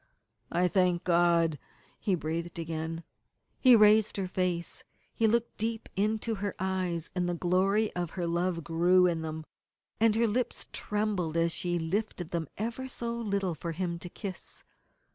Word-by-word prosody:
"I 180 +1 +3
thank 180 -1 +2
God," 170 -3 +3 0.4
he 195 - +1
breathed 165 +1 -4
again. 165 0 -4 0.6
He 255 -2 +8
raised 215 -1 +5
her 190 -2 -1
face. 180 -2 -2 0.3
He 225 - +2
looked 235 +1 0
deep 225 +1 -2
into 215 +3 0
her 205 -1 -3
eyes, 185 -3 -2
and 180 -1 0
the 175 - -1
glory 190 +5 +1
of 175 -2 -2
her 175 - -1
love 170 0 0
grew 175 +3 +4
in 170 -2 +1
them, 160 0 -5 0.5
and 220 -1 +4
her 230 +1 +3
lips 235 +3 -1
trembled 205 -6 -1
as 165 0 +2
she 175 +1 -1
lifted 175 +1 -2
them 165 -3 -2
ever 235 +5 -3
so 235 -2 -4
little 200 -5 -1
for 165 +1 -5
him 170 0 -3
to 180 - -7
kiss. 190 -1 -8
180 Hz, 160 wpm, -30 LUFS, 170-210 Hz, 0.6 s, He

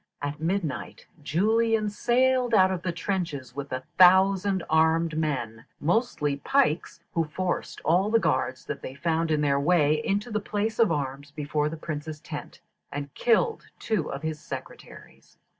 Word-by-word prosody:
At 145 +1 -4
midnight 160 - -3 0.2
Julian 215 - +2
sallied 245 +2 +2
out 190 -2 +5
of 185 -2 -2
the 175 - -2
trenches 165 - -3
with 140 0 -6
a 130 0 -3 0.2
thousand 190 +1 +5
armed 160 0 +2
men, 130 -8 -2
mostly 155 - 0
pikes, 175 - 0
who 165 -1 +1
forced 170 +1 -3
all 180 +7 +2
the 230 - +4
guards 130 -9 0
that 150 - -5
they 130 - -7
found 165 +2 0
in 155 -1 +1
their 140 -1 +2
way 150 -1 +3
into 205 +4 -1
the 215 - 0
place 210 +2 -2
of 225 -6 +4
arms 140 -1 -3
before 150 0 -1
the 165 - -6
Prince's 155 -1 -5
tent, - - -8 0.3
and 140 -1 -5
killed 245 - +1
two 205 -9 -1
of 140 +2 -6
his 160 -1 -3
secretaries. - - -10
165 Hz, 160 wpm, -26 LUFS, 145-200 Hz, 0.3 s, out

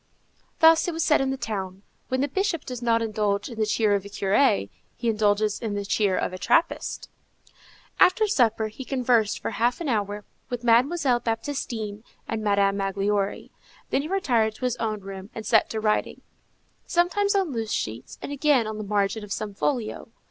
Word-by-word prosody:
Thus 325 +1 +6
it 345 - -2
was 330 - 0
said 305 - +4
in 270 - 0
the 270 - -2
town, 195 -5 -5 0.2
when 260 0 0
the 285 - +1
Bishop 370 +1 -1
does 250 -2 -6
not 230 -1 +2
indulge 210 -1 -1
in 230 -2 -8
the 215 - +1
cheer 215 -1 +2
of 200 -1 0
a 200 - -9
curé, 195 - +2 0.2
he 235 - -1
indulges 210 -1 +1
in 220 -3 -3
the 200 0 -3
cheer 200 -1 +1
of - - -2
a 185 - -6
trappist. 330 - 0 0.9
After 435 +4 +5
supper 225 - +2
he 220 +5 -9
conversed 245 -5 +1
for - - -3
half 240 +2 0
an 335 - -4
hour 210 -4 -1 0.2
with 245 -1 -4
Mademoiselle 250 +2 +3
Baptistine 225 -3 -3 0.2
and 220 -1 -3
Madame 200 -1 +2
Magloire; 195 +1 -1 0.4
then - - +2
he 295 - -5
retired 245 - +1
to 255 - -4
his 250 -1 0
own 215 -2 -2
room 195 0 -8
and 220 - -6
set 220 - +3
to 220 - -3
writing, 215 -1 0 0.7
sometimes 400 +4 +2
on 380 -6 +1
loose 225 -3 -3
sheets, 115 +4 -4
and - - -5
again 285 -4 +3
on 215 0 -5
the - - -3
margin 205 +1 0
of 205 - -10
some 210 0 -3
folio. 230 +1 -2
225 Hz, 190 wpm, -25 LUFS, 205-265 Hz, 0.9 s, Thus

